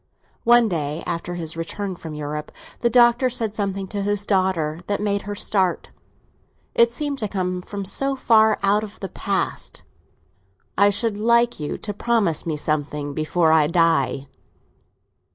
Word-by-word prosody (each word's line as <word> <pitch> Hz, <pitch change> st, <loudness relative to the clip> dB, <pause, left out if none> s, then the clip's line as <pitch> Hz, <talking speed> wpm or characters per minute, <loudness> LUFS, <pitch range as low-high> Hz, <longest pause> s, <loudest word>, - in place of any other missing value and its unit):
One 240 Hz, 0 st, +6 dB
day, 155 Hz, -4 st, -3 dB
after 175 Hz, +1 st, -3 dB
his 165 Hz, -2 st, -4 dB
return 185 Hz, +4 st, -4 dB
from 160 Hz, -3 st, -8 dB
Europe, 150 Hz, 0 st, -5 dB, 0.3 s
the 235 Hz, -, +2 dB
Doctor 240 Hz, +1 st, +5 dB
said 230 Hz, -4 st, -2 dB
something 195 Hz, -2 st, -3 dB
to 205 Hz, -, -3 dB
his 205 Hz, 0 st, -1 dB
daughter 185 Hz, -6 st, 0 dB
that 205 Hz, -, -1 dB
made 200 Hz, -1 st, 0 dB
her 205 Hz, -, -3 dB
start—it 200 Hz, +4 st, -2 dB
seemed 280 Hz, +3 st, -3 dB
to 215 Hz, -, -1 dB
come 180 Hz, -2 st, -2 dB
from 200 Hz, +1 st, -6 dB
so 275 Hz, +8 st, -1 dB
far 220 Hz, -4 st, +4 dB
out 205 Hz, +2 st, +3 dB
of 210 Hz, -1 st, -9 dB
the 195 Hz, -, -5 dB
past. 195 Hz, +1 st, -3 dB, 0.9 s
"I 200 Hz, +1 st, +5 dB
should 205 Hz, +1 st, 0 dB
like 235 Hz, 0 st, +3 dB
you 150 Hz, -, -3 dB
to 205 Hz, -, -5 dB
promise 205 Hz, -8 st, 0 dB
me 155 Hz, -2 st, -1 dB
something 150 Hz, -1 st, -2 dB
before 160 Hz, +2 st, +1 dB
I 155 Hz, -2 st, +4 dB
die." 165 Hz, -4 st, +1 dB
195 Hz, 155 wpm, -22 LUFS, 165-220 Hz, 0.9 s, One